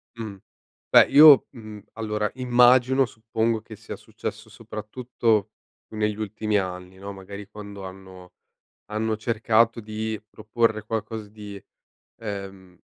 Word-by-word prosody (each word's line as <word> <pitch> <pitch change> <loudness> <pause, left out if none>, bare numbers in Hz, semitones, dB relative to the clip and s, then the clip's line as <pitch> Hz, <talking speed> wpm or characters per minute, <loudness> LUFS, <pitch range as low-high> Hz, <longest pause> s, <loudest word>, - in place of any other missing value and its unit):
Mh. 110 -3 -6 0.5
Beh - - +8
io, 150 -2 +9
mhmm, 110 -3 -10
allora 105 -1 -2
immagino, 125 +1 +4
suppongo 115 -1 -2
che 110 -1 -11
sia 110 +1 -8
successo 110 0 -7
soprattutto 110 0 -2 0.4
negli 105 -1 -1
ultimi 105 0 -1
anni 90 -1 -4
no? 100 +1 -7
Magari 100 +1 -9
quando 100 -1 -10
hanno 95 -1 -11 0.6
hanno 110 +1 -1
cercato 115 +1 +2
di 110 0 -4
proporre 110 0 -1
qualcosa 110 -1 -4
di 105 -2 -10 0.6
ehm 100 -4 -8
110 Hz, 115 wpm, -24 LUFS, 100-115 Hz, 0.6 s, io